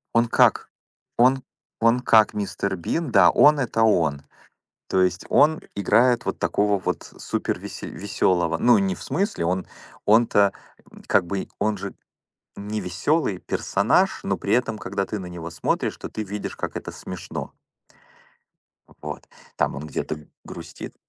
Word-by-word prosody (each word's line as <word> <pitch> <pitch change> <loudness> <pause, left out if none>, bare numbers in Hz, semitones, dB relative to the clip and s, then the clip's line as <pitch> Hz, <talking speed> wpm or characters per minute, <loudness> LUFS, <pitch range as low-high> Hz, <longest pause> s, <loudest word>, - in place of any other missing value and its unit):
Он 115 0 +4
как - - +3 0.5
он 130 +2 +4 0.4
он 115 +2 +4
как 110 -3 +4
Мистер 100 -1 -2
Бин, 145 - -2
да, 100 -3 +7
он 150 0 +5
это 115 -3 +1
он. 80 -10 +2 0.7
То 95 - +2
есть 90 0 0
он 155 +2 +4 0.2
играет 120 +4 +3
вот - - -3
такого 105 0 +1
вот 95 - -3 0.2
супервесе - - -4
весёлого, 85 -2 0
ну, 120 +8 +5
не 195 -1 0
в - - -11
смысле, 180 - -1
он, 90 +1 -1 0.4
он-то 105 -2 +4 0.5
как 95 -3 +3
бы 95 +2 -3
он 105 +1 0
же 95 - -6 0.6
не 105 +1 -4
весёлый 95 - 0
персонаж, - - +1
но - - -1
при 100 - -3
этом, 120 -2 +1
когда 100 -2 -3
ты 105 - -4
на 95 - -7
него 85 -1 -7
смотришь, 85 - -1
то - - -8
ты 110 - -4
видишь, 105 +1 -5
как - - -5
это - - -6
смешно. - - -7 1.5
Вот, - - -7 0.3
там - - 0
он 75 +2 -6
где-то 75 0 -5 0.2
грустит. - - -9
105 Hz, 150 wpm, -23 LUFS, 90-120 Hz, 1.5 s, да